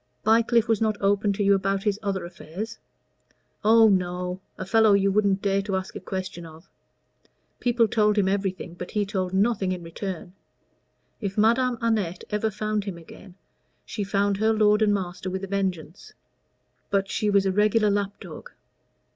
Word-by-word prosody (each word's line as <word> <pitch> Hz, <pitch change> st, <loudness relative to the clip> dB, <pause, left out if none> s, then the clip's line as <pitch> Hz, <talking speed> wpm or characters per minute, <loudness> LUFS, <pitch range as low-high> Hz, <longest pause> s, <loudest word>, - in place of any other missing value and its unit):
"Bycliffe 230 Hz, +1 st, +3 dB
was 225 Hz, -2 st, +1 dB
not 215 Hz, -1 st, +1 dB
open 200 Hz, +1 st, +2 dB
to 205 Hz, +1 st, -1 dB
you 200 Hz, 0 st, +5 dB
about 195 Hz, 0 st, 0 dB
his 210 Hz, -1 st, 0 dB
other 195 Hz, -4 st, -2 dB
affairs?" 185 Hz, +6 st, -8 dB, 0.8 s
"Oh, 225 Hz, +1 st, +6 dB
no 180 Hz, -1 st, -1 dB, 0.2 s
a 185 Hz, -, -5 dB
fellow 220 Hz, +1 st, +4 dB
you 200 Hz, 0 st, +3 dB
wouldn't 200 Hz, -1 st, +1 dB
dare 195 Hz, -1 st, +1 dB
to 195 Hz, -1 st, -3 dB
ask 190 Hz, 0 st, -4 dB
a -, -, -4 dB
question 185 Hz, -2 st, -5 dB
of. 165 Hz, +2 st, -13 dB, 0.9 s
People 240 Hz, -2 st, +2 dB
told 210 Hz, -1 st, +2 dB
him 200 Hz, -2 st, +3 dB
everything, 190 Hz, -3 st, -2 dB
but 175 Hz, 0 st, -8 dB
he 210 Hz, -1 st, -1 dB
told 190 Hz, -3 st, -2 dB
nothing 195 Hz, -1 st, +1 dB
in 180 Hz, -2 st, -4 dB
return. 175 Hz, +1 st, -6 dB, 0.9 s
If 200 Hz, -2 st, -4 dB
Madame 235 Hz, +3 st, +3 dB
Annette 210 Hz, -7 st, -1 dB
ever 210 Hz, +1 st, 0 dB
found 215 Hz, 0 st, -2 dB
him 195 Hz, -4 st, -5 dB
again, 175 Hz, +2 st, -14 dB, 0.5 s
she 210 Hz, -, -4 dB
found 200 Hz, 0 st, 0 dB
her 220 Hz, +2 st, +2 dB
lord 210 Hz, 0 st, +3 dB
and 215 Hz, -1 st, +4 dB
master 185 Hz, -2 st, -3 dB
with 190 Hz, +1 st, -4 dB
a -, -, -3 dB
vengeance; 190 Hz, -3 st, -4 dB, 0.8 s
but 195 Hz, -1 st, +1 dB
she 210 Hz, +1 st, -1 dB
was 200 Hz, -1 st, +3 dB
a 190 Hz, -, +2 dB
regular 210 Hz, +2 st, +3 dB
lapdog. 200 Hz, 0 st, -4 dB
200 Hz, 170 wpm, -25 LUFS, 190-215 Hz, 0.9 s, Oh